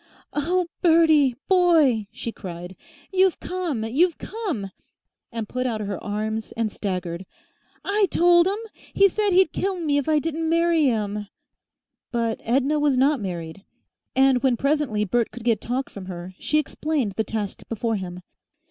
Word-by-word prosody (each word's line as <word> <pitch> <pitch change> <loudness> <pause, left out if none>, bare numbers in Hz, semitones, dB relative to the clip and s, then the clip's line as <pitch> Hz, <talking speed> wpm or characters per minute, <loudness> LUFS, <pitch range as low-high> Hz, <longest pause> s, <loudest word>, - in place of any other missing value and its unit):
"Oh! 350 +5 +1 0.2
Bertie, 315 -6 +5
boy!" 320 - +4
she 230 - -5
cried. 175 -3 -8 0.4
"You've 375 -1 +3
come 345 -11 -3
you've 305 +10 +2
come!" 360 - -4 0.6
and 230 -2 -4
put 255 +3 -2
out 225 -3 -2
her 200 -3 -4
arms 215 +1 -3
and 225 -2 -1
staggered. 180 -4 -4 0.6
"I 405 0 +2
told 345 0 +5
'im. 395 +2 0 0.4
He 395 - +7
said 415 +2 0
he'd 370 -3 +4
kill 385 -1 -1
me 295 -4 +1
if 285 - -3
I 310 - +4
didn't 320 +1 -1
marry 335 -1 +3
him." 210 -4 -1 0.8
But 230 -2 -1
Edna 275 +5 +1
was 290 -3 +2
not 275 0 +3
married, 175 -1 -5 0.5
and 265 -1 +4
when 255 -3 +2
presently 275 -7 +1
Bert 230 +4 +1
could 245 - -10
get 230 -3 +1
talk 255 +3 -2
from 190 -2 -10
her, 180 0 -7
she 305 - 0
explained 300 -5 -1
the 220 +3 -1
task 210 -2 -4
before 225 0 -1
him. 180 -1 -6
255 Hz, 155 wpm, -24 LUFS, 210-325 Hz, 0.8 s, He